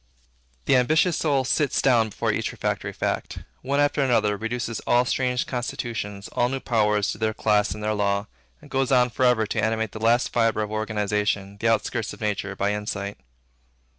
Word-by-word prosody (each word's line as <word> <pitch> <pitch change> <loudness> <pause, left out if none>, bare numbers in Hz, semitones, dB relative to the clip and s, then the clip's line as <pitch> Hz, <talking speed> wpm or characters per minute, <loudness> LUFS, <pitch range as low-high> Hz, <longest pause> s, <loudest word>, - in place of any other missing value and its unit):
The - - +4
ambitious 155 +7 +3
soul 140 -5 +1
sits 145 +1 +1
down 115 -4 +3
before - - -1
each - - -2
refractory - - -3
fact; - - -3 0.2
one 140 +2 0
after 145 0 +2
another, 110 -6 +2
reduces 115 +1 -3
all 120 +1 +4
strange 125 0 0
constitutions, 115 -5 -4
all 120 - +1
new 135 +1 -2
powers, 105 -5 +1
to - - -7
their 110 -1 0
class 105 -3 +1
and 105 - -8
their 110 0 0
law, 100 0 0 0.4
and - - -15
goes 135 -1 0
on 125 -2 +4
for 130 - +1
ever 120 -3 +3
to 105 - -2
animate 110 -1 0
the 110 - -8
last 115 +2 +2
fibre 115 -2 +2
of 105 - -6
organization, 105 -2 -1
the 115 - 0
outskirts 115 0 0
of - - -13
nature, 100 -2 -2
by 100 +1 0
insight. 105 -1 -4
110 Hz, 185 wpm, -24 LUFS, 105-125 Hz, 0.4 s, The